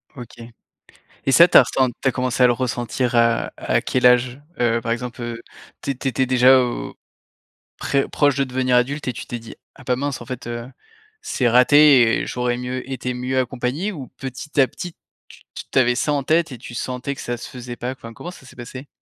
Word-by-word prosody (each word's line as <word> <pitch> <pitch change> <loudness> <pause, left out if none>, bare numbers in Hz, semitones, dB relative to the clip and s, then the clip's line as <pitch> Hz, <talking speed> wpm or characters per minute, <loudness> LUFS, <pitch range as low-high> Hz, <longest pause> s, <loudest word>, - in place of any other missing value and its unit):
OK. 120 -3 -11 0.9
Et 135 - +2
ça 170 +4 +8
tu - - +4
as - - +11
ressen 130 -2 +1
tu 135 - +3
as - - +1
commencé 125 0 -1
à - - +8
le 120 - +4
ressentir, 125 0 -2
heu, 115 0 +3
à - - 0
quel 125 -1 +1
âge? 125 +2 +3 0.2
Heu, 115 -1 +2
par 115 0 -2
exemple, 120 0 -5
heu, 120 0 -5 0.4
tu - - -3
é - - -1
tu 135 +1 -3
étais 130 0 0
déjà 130 +1 +6
au, 120 -1 -3 0.8
très 140 0 0
proche 145 -2 +2
de 140 - +2
devenir 130 -1 0
adulte 135 +4 0
et 125 - -1
tu - - -8
t'es 120 - -5
dit: 115 - -11 0.2
«Ah 145 - -15
bah, 125 0 0
mince 140 +1 -3
en - - -9
fait, 130 -2 -7
heu, 120 0 -5 0.5
c'est 125 - 0
raté 125 -1 +6
et - - -4
j'aurais 125 -1 -1
mieux 125 +1 -5
été 125 -1 -3
mieux 130 +1 -1
accompagné», 130 - -2
ou 140 -9 -8
petit 135 +2 -5
à 130 - +4
petit 175 +4 -8 0.3
tu - - -16
t - - -6
t'avais 125 -2 +3
ça 150 +3 0
en 140 - -1
tête 160 +2 +1
et 125 - -7
tu 120 +1 -10
sentais 130 +3 -4
que - - -9
ça 120 - -3
se - - -9
faisait 125 -1 -8
pas? 125 +1 -4
Enfin, 115 -3 -10
comment 175 +9 -8
ça 135 - -15
s'est - - -15
passé? 130 +3 -9
125 Hz, 225 wpm, -21 LUFS, 120-135 Hz, 0.9 s, as